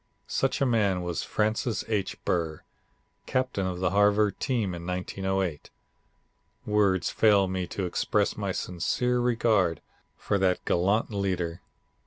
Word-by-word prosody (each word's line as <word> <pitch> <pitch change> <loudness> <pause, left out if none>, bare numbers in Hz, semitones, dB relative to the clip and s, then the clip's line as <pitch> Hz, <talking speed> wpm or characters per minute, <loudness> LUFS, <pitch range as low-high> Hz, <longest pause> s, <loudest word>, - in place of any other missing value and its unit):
Such 135 +2 -1
a - - +4
man 100 -7 +1
was 85 -2 -2
Francis 110 +1 -1
H. 105 -4 -1
Burr, 80 -3 -1 0.6
captain 130 -7 0
of 90 -1 -3
the 90 -1 +1
Harvard 105 +1 +3
team 115 -9 0
in 85 -1 -7
1908. 95 -2 -2 1.0
Words 100 -3 +2
fail 100 -3 +4
me 95 -1 -2
to 95 - -3
express 90 - 0
my - - -2
sincere 125 +8 -1
regard 115 -8 +2 0.4
for 100 - -1
that 95 -1 +1
gallant 100 +7 +1
leader. 90 -4 -2
95 Hz, 130 wpm, -27 LUFS, 90-110 Hz, 1.0 s, a